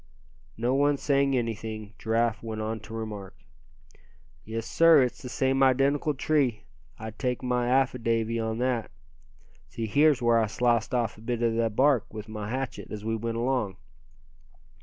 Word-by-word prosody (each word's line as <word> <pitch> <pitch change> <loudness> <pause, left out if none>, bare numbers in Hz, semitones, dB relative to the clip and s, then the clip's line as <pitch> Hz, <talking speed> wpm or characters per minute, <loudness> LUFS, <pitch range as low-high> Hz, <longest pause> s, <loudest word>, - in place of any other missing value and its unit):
No 120 +3 0
one 145 +1 +3
saying 140 -1 +2
anything, 110 -2 -4
Giraffe 115 0 0
went 110 -1 -5
on 110 +1 -3
to 105 +2 -12
remark: 105 -4 -6 1.1
"Yes 115 +1 -5
sir, 165 +2 +6
it's 125 -1 -3
the 125 - -7
same 135 +2 +1
identical 135 +3 +3
tree, 135 -5 +1 0.3
I'd 110 0 -8
take 125 -2 -1
my 125 -1 0
affidavy 115 -3 +1
on 110 0 -2
that. 125 -2 -1 0.8
See 115 +7 -4
here's 145 +4 +4
where 120 -1 +3
I 110 - +1
sliced 120 +1 +1
off 115 -3 -1
a - - -14
bit 120 +1 -2
of 115 -1 +2
the 115 0 +1
bark 130 +1 +2
with 110 0 -8
my 105 -1 -6
hatchet, 130 +1 -4
as 105 0 -7
we 115 0 0
went 115 +1 -3
along. 120 -6 -1
115 Hz, 160 wpm, -27 LUFS, 110-130 Hz, 1.1 s, sir